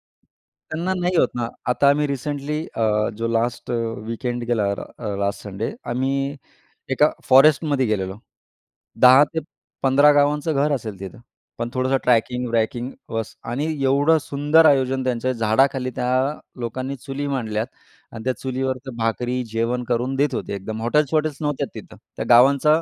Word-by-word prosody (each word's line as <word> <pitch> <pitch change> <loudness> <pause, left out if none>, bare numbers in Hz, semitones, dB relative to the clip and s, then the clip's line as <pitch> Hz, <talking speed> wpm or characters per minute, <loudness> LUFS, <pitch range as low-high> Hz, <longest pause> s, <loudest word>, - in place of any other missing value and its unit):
त्यांना 170 +4 -7
नाही 180 0 0
होत - - +4
ना. 120 -1 -1 0.2
आता 140 +2 +3
आम्ही 145 +1 +2
रिसेंटली 145 +2 -3 0.2
अ, 105 -1 +1
जो 115 - -1
लास्ट 115 +1 -1 0.4
वीकेंड 120 +1 -3
गेला, 115 -4 +1 0.3
अ, 105 -4 -4
लास्ट 100 0 -1
संडे 100 -2 -4 0.2
आम्ही 135 +3 -1 0.6
एका 150 +3 +4 0.2
फॉरेस्टमध्ये 140 0 +5
गेलेलो. 100 -2 -2 0.8
10 130 +3 +8
ते 160 - 0 0.4
15 140 +2 +6
गावांचं 145 +2 +2
घर 145 +2 +2
असेल 110 -7 -4
तिथं 100 +5 -8 0.4
पण 120 0 -3
थोडंसं 130 +1 +1
ट्रॅकिंग-ब्रॅकिंग 120 0 0 0.2
बस 115 -1 -3 0.2
आणि 140 +5 -1 0.2
एवढं 145 +4 +4
सुंदर 150 +2 +3
आयोजन 135 -2 +3
त्यांच्या 130 0 -1
झाडाखाली 125 +3 +1
त्या 125 0 -1 0.5
लोकांनी 130 +3 -4
चुली 140 +2 -5
मांडल्यात 115 -5 -2 0.4
आणि 110 -1 -8
त्या 130 - 0
चुलीवर 130 0 -2
तर 130 - -6
भाकरी 120 +2 -1
जेवण 115 +2 -1
करून 125 +2 0
देत 140 0 +1
होते, - - -4
एकदम 110 +3 -6
हॉटेल्स 150 +6 +1
वॉटेल्स 155 -2 +1
नव्हत्या 145 -2 -1
तिथं. - - -10 0.2
त्या - - -4
गावांचा 140 +6 +5
130 Hz, 145 wpm, -22 LUFS, 115-145 Hz, 0.8 s, 10